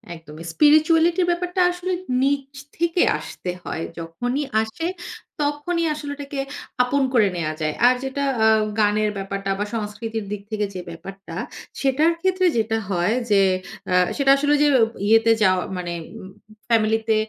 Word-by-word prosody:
একদমই। 160 Hz, 0 st, -11 dB
স্পিরিচুয়ালিটির 325 Hz, +4 st, +4 dB
ব্যাপারটা 355 Hz, +1 st, -1 dB
আসলে 355 Hz, +1 st, -4 dB, 0.3 s
নিচ 275 Hz, 0 st, 0 dB, 0.3 s
থেকে 340 Hz, +1 st, +1 dB, 0.2 s
আসতে 180 Hz, -, -6 dB
হয়। 165 Hz, -, -4 dB, 0.2 s
যখনই 245 Hz, -, -3 dB, 0.2 s
আসে 220 Hz, +10 st, -4 dB, 0.6 s
তখনই 295 Hz, +4 st, -1 dB
আসলে 295 Hz, -1 st, -6 dB
ওটাকে 285 Hz, -1 st, -6 dB, 0.4 s
আপন 275 Hz, +3 st, +1 dB
করে 220 Hz, -5 st, +5 dB
নেয়া 155 Hz, -3 st, -2 dB
যায়। 155 Hz, -1 st, -1 dB
আর 250 Hz, -, +5 dB
যেটা 270 Hz, +1 st, -3 dB, 0.2 s
আ -, -, +6 dB, 0.3 s
গানের 210 Hz, 0 st, +2 dB
ব্যাপারটা 195 Hz, 0 st, -3 dB
বা 205 Hz, -, 0 dB
সংস্কৃতির 220 Hz, 0 st, -4 dB
দিক 210 Hz, -1 st, -4 dB
থেকে 210 Hz, -1 st, 0 dB
যে 185 Hz, -, -5 dB
ব্যাপারটা। 195 Hz, +4 st, -9 dB, 0.5 s
সেটার 290 Hz, +5 st, +3 dB
ক্ষেত্রে 370 Hz, 0 st, +1 dB
যেটা 225 Hz, 0 st, +1 dB
হয় 180 Hz, +3 st, +1 dB, 0.2 s
যে, 200 Hz, -1 st, +5 dB, 0.5 s
আ -, -, +2 dB, 0.2 s
সেটা 275 Hz, -1 st, +4 dB
আসলে 290 Hz, +1 st, +2 dB
যের 290 Hz, -1 st, +4 dB
ও -, -, +7 dB, 0.2 s
ইয়েতে 225 Hz, +1 st, +5 dB
যাওয়া 185 Hz, -2 st, +3 dB
মানে 175 Hz, -1 st, -4 dB, 0.3 s
উ -, -, -10 dB, 0.5 s
ফ্যামিলিতে 220 Hz, 0 st, +2 dB
230 Hz, 150 wpm, -22 LUFS, 200-295 Hz, 0.6 s, ও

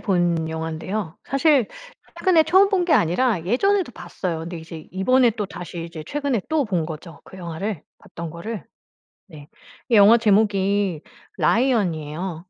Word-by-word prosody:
본 175 Hz, -5 st, 0 dB
영화인데요. 160 Hz, +3 st, -4 dB
사실 275 Hz, -3 st, +3 dB, 0.5 s
최근에 350 Hz, -4 st, +4 dB
처음 375 Hz, +5 st, +5 dB
본 385 Hz, -3 st, +1 dB
게 345 Hz, -, +1 dB
아니라 180 Hz, +2 st, +2 dB
예전에도 370 Hz, -, +1 dB
봤어요. 175 Hz, -2 st, -5 dB
근데 170 Hz, +1 st, -6 dB
이제 160 Hz, -1 st, -10 dB
이번에 245 Hz, +6 st, +3 dB
또 210 Hz, -2 st, -4 dB
다시 175 Hz, -2 st, -7 dB
이제 165 Hz, -2 st, -8 dB
최근에 280 Hz, -, -1 dB
또 310 Hz, -2 st, +1 dB
본 180 Hz, -7 st, -1 dB
거죠. 160 Hz, 0 st, -9 dB
그 -, -, -13 dB
영화를 175 Hz, 0 st, -5 dB, 0.2 s
봤던 170 Hz, -1 st, -8 dB
거를. 205 Hz, +6 st, -6 dB, 0.7 s
네 145 Hz, -3 st, -12 dB, 0.4 s
이 235 Hz, -, +4 dB
영화 210 Hz, +3 st, +8 dB
제목이 200 Hz, -5 st, +2 dB, 0.4 s
라이언이에요. 180 Hz, -, 0 dB
190 Hz, 310 characters per minute, -22 LUFS, 165-245 Hz, 0.7 s, 영화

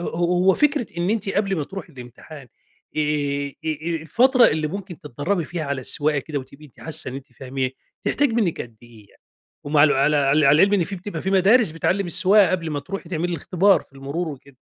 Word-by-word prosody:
هو 180 Hz, +2 st, +2 dB
فكرة 295 Hz, -5 st, +1 dB
إن 175 Hz, +3 st, 0 dB
أنتِ 215 Hz, -2 st, -1 dB
قبل 195 Hz, -1 st, 0 dB
ما 150 Hz, -, -2 dB
تروحي 190 Hz, +1 st, -9 dB
الإمتحان 125 Hz, +2 st, -12 dB, 0.5 s
آآ، -, -, +1 dB
آآ، 145 Hz, -1 st, -1 dB, 0.2 s
آآ، 160 Hz, +2 st, -2 dB
الفترة 250 Hz, -, +4 dB
اللي 155 Hz, 0 st, 0 dB
ممكن 185 Hz, -1 st, -7 dB
تتدرّبي 150 Hz, +6 st, -2 dB
فيها 170 Hz, -1 st, -5 dB
على 140 Hz, -1 st, -3 dB
السواقة 145 Hz, +3 st, -1 dB
كده 145 Hz, +1 st, -4 dB
وتبقي 140 Hz, +3 st, -12 dB
أنتِ 135 Hz, -, -21 dB
حاسة 160 Hz, -4 st, -1 dB
إن -, -, -8 dB
أنتِ 135 Hz, -2 st, -10 dB
فاهما 130 Hz, +1 st, -4 dB, 0.3 s
تحتاج 290 Hz, 0 st, +2 dB
منِّك 215 Hz, -8 st, 0 dB
قد 115 Hz, -2 st, -8 dB
إيه 115 Hz, -4 st, -17 dB
يعني، -, -, -28 dB, 0.4 s
ومع 145 Hz, 0 st, +4 dB
الو 155 Hz, -, +3 dB
على 145 Hz, +3 st, +2 dB
عل 140 Hz, -1 st, +2 dB, 0.2 s
على 140 Hz, +1 st, +6 dB
العلم 200 Hz, +1 st, +3 dB
إن 180 Hz, -, +2 dB
في 195 Hz, +3 st, -6 dB
بتبقى 175 Hz, -2 st, -6 dB
في 190 Hz, -, -2 dB
مدارس 195 Hz, +2 st, +4 dB
بتعلم 185 Hz, +4 st, 0 dB
السواقة 190 Hz, +3 st, +4 dB
قبل 170 Hz, -3 st, -2 dB
ما 145 Hz, -1 st, -2 dB
تروحي 185 Hz, +3 st, -7 dB
تعملي 175 Hz, 0 st, -2 dB
الإختبار 185 Hz, +4 st, +2 dB
في -, -, -22 dB
المرور 140 Hz, +6 st, -4 dB
وكده؟ 140 Hz, -2 st, -11 dB
160 Hz, 210 wpm, -22 LUFS, 140-190 Hz, 0.5 s, على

